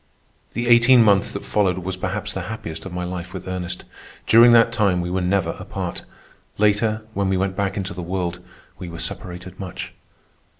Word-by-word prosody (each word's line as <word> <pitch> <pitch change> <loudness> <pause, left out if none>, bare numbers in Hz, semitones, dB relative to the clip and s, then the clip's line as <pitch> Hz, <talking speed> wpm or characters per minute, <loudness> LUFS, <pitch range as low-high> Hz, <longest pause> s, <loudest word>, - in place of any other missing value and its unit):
The 120 0 -2
eighteen 120 +1 +7
months 100 -2 +4
that 100 - -7
followed 95 -4 +1
was 95 +1 -4
perhaps 90 - -3
the - - -3
happiest 85 -6 -6
of - - -9
my 90 0 -3
life 90 0 -6
with - - -7
Ernest. 90 -1 -4 0.4
During 115 +2 +7
that 115 0 +5
time 100 -6 +2
we 90 0 -3
were 95 +1 0
never 90 -2 +1
apart. - - -5 0.5
Later, 105 +1 +2
when 100 -2 0
we 95 - +1
went 95 0 -1
back 100 +1 -1
into 95 -3 -3
the 90 - -6
world, 90 0 -3 0.4
we 90 - -6
were 85 - -8
separated 90 +2 -6
much. 95 -3 -6
95 Hz, 185 wpm, -22 LUFS, 90-105 Hz, 0.5 s, eighteen